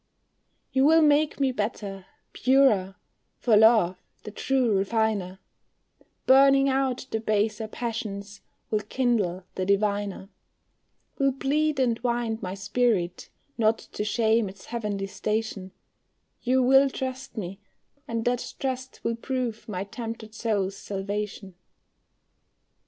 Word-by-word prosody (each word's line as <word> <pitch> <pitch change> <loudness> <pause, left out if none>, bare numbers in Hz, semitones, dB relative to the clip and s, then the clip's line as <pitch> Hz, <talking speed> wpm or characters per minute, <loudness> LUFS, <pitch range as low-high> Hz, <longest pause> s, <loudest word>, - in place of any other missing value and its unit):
You 265 -1 +2
will 320 +2 +6
make 295 0 +3
me 270 -2 +2
better, 205 -4 -4 0.3
purer, 250 -8 +3 0.4
for 230 -3 +3
love, 210 -5 +5 0.2
the 210 - -7
true 250 -1 +1
refiner, 200 -2 0 0.9
Burning 275 +1 +6
out 265 -2 0
the 220 - 0
baser 215 0 0
passions, 210 -4 -5 0.3
will 215 - +2
kindle 210 -5 0
the 185 - -2
diviner, 200 0 0 0.9
Will 275 0 +3
plead 290 +2 0
and 235 -3 +1
wind 235 -2 -1
my 185 -1 -4
spirit, 195 -3 0 0.3
not 220 0 +3
to - - -6
shame 220 0 +2
its 190 +1 -13
heavenly 210 -4 -3
station, 210 -1 -3 0.7
You 255 +1 +2
will 270 +2 +6
trust 260 -2 -5
me, 195 -1 -5 0.5
and 230 -1 -3
that 245 0 -1
trust 260 -1 -4
will 230 - 0
prove 240 -2 -4
my 190 -2 -3
tempted 225 +1 -7
soul's 205 -4 -1
salvation. 200 0 -5
220 Hz, 120 wpm, -26 LUFS, 200-255 Hz, 0.9 s, will